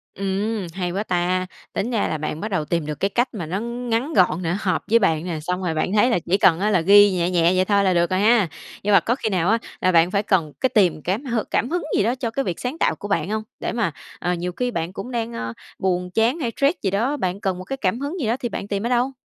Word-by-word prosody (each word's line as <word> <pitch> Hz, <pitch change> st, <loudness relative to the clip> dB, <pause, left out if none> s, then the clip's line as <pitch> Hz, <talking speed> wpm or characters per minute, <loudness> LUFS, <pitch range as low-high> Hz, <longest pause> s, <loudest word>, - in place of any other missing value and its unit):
Ừm, 195 Hz, +1 st, -2 dB
hay 180 Hz, 0 st, -3 dB
quá 195 Hz, +4 st, -2 dB
ta, 185 Hz, -1 st, 0 dB, 0.3 s
tính 230 Hz, -, -2 dB
ra 225 Hz, -4 st, 0 dB
là 155 Hz, -, -2 dB
bạn 155 Hz, +1 st, -4 dB
bắt 215 Hz, -, -3 dB
đầu 185 Hz, -6 st, 0 dB
tìm 165 Hz, 0 st, -1 dB
được 150 Hz, -1 st, -5 dB
cái 195 Hz, -, +2 dB
cách 245 Hz, +5 st, +1 dB
mà 175 Hz, -7 st, -4 dB
nó 185 Hz, +5 st, -2 dB
ngắn 235 Hz, +4 st, -2 dB
gọn 180 Hz, -1 st, +3 dB
nè, 175 Hz, +1 st, 0 dB
hợp 185 Hz, -3 st, 0 dB
với 230 Hz, -, +6 dB
bạn 165 Hz, -7 st, +1 dB
nè, 170 Hz, -3 st, -3 dB
xong 180 Hz, +4 st, -3 dB
rồi 170 Hz, -3 st, -1 dB
bạn 155 Hz, +4 st, -1 dB
thấy 215 Hz, +4 st, +4 dB
là 230 Hz, -, +2 dB
chỉ 175 Hz, +3 st, 0 dB
cần 170 Hz, -3 st, +4 dB
á 210 Hz, +2 st, +2 dB
là 185 Hz, -5 st, +3 dB
ghi 205 Hz, +4 st, +7 dB
nhẹ 180 Hz, -1 st, 0 dB
nhẹ 170 Hz, -1 st, +3 dB
vậy 185 Hz, -, +3 dB
thôi 200 Hz, 0 st, +2 dB
là 185 Hz, -2 st, +3 dB
được 170 Hz, +1 st, +2 dB
rồi 185 Hz, 0 st, +1 dB
ha. 215 Hz, -3 st, +4 dB, 0.3 s
Nhưng 205 Hz, 0 st, +2 dB
mà -, -, +7 dB
có 235 Hz, -, 0 dB
khi 225 Hz, -, -2 dB
nào 180 Hz, -4 st, 0 dB
á 225 Hz, +2 st, +3 dB, 0.2 s
là 185 Hz, -, +2 dB
bạn 170 Hz, +1 st, +4 dB
phải 200 Hz, +1 st, +1 dB
cần 180 Hz, -7 st, +1 dB
cái 260 Hz, -, +3 dB
tìm 185 Hz, -10 st, +2 dB
cám 195 Hz, -, -2 dB
hừ 235 Hz, -5 st, -1 dB
cảm 245 Hz, -, -1 dB
hứng 355 Hz, +1 st, -1 dB
gì -, -, +3 dB
đó 230 Hz, +4 st, +1 dB
cho 250 Hz, -3 st, -3 dB
cái 275 Hz, +4 st, -2 dB
việc 175 Hz, -3 st, -3 dB
sáng 255 Hz, +6 st, -4 dB
tạo -, -, +2 dB
của 205 Hz, -, -7 dB
bạn 180 Hz, -2 st, 0 dB
hông? 215 Hz, 0 st, -1 dB, 0.2 s
Để -, -, -2 dB
mà, 230 Hz, -8 st, 0 dB, 0.3 s
ờ, 180 Hz, -, -1 dB
nhiều 180 Hz, +1 st, -3 dB
khi 250 Hz, +6 st, -2 dB
bạn 170 Hz, -5 st, -3 dB
cũng 195 Hz, +6 st, -7 dB
đang, 235 Hz, -1 st, -2 dB
ơ, 115 Hz, -, -4 dB, 0.3 s
buồn 180 Hz, -1 st, -1 dB
chán 225 Hz, -, +2 dB
hay 245 Hz, -7 st, -2 dB
stress 285 Hz, +5 st, +2 dB
gì 195 Hz, -, +1 dB
đó, 235 Hz, +9 st, 0 dB
bạn 185 Hz, -6 st, -2 dB
cần 190 Hz, -3 st, -1 dB
một 185 Hz, -, -7 dB
cái 270 Hz, -, -4 dB
cảm 225 Hz, -1 st, -1 dB
hứng 295 Hz, +6 st, -4 dB
gì 255 Hz, -, -1 dB
đó 230 Hz, +2 st, +1 dB
thì 240 Hz, -, -2 dB
bạn 200 Hz, -2 st, -5 dB
tìm 200 Hz, +2 st, -2 dB
ở -, -, +1 dB
đâu? 250 Hz, +2 st, +1 dB
195 Hz, 295 wpm, -22 LUFS, 180-230 Hz, 0.3 s, ghi